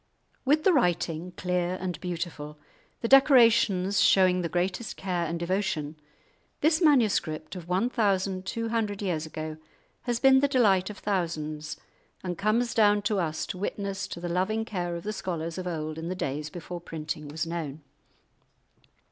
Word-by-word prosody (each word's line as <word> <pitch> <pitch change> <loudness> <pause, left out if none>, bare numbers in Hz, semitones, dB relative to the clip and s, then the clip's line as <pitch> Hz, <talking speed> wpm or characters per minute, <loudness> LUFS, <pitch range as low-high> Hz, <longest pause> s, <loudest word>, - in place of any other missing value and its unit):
With 300 +3 +3
the 380 - +5
writing 175 - 0
clear 180 0 -1
and 180 -1 -4
beautiful, 170 -4 -5 0.4
the 230 - 0
decorations 230 -8 +5
showing 185 -1 +5
the 170 - -2
greatest 185 +6 -2
care 180 -3 -1
and 165 +1 -3
devotion, 170 -4 -1 0.7
this 315 +3 +3
manuscript 200 - +2
of 175 -2 -8
one 190 +6 +2
thousand 195 -5 0
two 230 +2 -2
hundred 215 -3 -1
years 160 -5 -1
ago 155 0 -6 0.5
has 240 -1 +1
been 265 0 +6
the 285 - +3
delight 205 -9 +3
of 210 - -8
thousands, 155 -6 -3 0.5
and 180 -1 -3
comes 225 +5 +1
down 205 -2 +4
to 205 -1 +1
us 160 -3 -1
to 180 - -6
witness 200 0 -3
to - - -7
the 175 - -4
loving 190 +6 0
care 175 -5 -3
of 170 - -6
the 215 - -3
scholars 170 -3 -4
of 180 - -4
old 155 -2 -4
in 165 +1 -5
the 185 - -2
days 150 -2 -3
before 175 +1 -7
printing 155 -2 -5
was 155 +3 -3
known. 160 -3 -5
185 Hz, 165 wpm, -27 LUFS, 165-210 Hz, 0.7 s, been